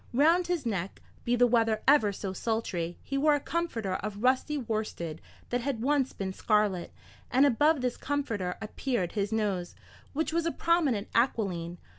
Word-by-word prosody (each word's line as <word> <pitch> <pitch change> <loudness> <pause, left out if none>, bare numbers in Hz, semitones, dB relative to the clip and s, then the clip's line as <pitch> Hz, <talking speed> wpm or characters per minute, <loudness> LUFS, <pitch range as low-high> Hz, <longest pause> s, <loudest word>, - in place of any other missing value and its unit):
Round 330 +6 +4
his 350 -6 -1
neck, 195 -4 -3 0.3
be 240 - +2
the 245 0 +5
weather 225 -2 +2
ever 270 -8 +5
so 195 -1 -5
sultry, 185 -6 -2
he 275 - -2
wore 300 +1 +4
a - - 0
comforter 235 - -2
of 210 +1 -6
rusty 260 +4 +2
worsted 215 - -3 0.3
that 245 0 +1
had 240 -3 -2
once 275 -1 +2
been 190 -1 -4
scarlet, 210 -4 +1 0.4
and 265 +3 +5
above 290 +3 +3
this 250 -1 -1
comforter 225 -11 -2
appeared 215 -4 -2
his 205 0 -2
nose, 200 -5 -1 0.4
which 315 +2 -1
was 335 0 +1
a - - +1
prominent 305 -14 +1
aquiline. 185 -8 0
230 Hz, 165 wpm, -29 LUFS, 200-285 Hz, 0.4 s, the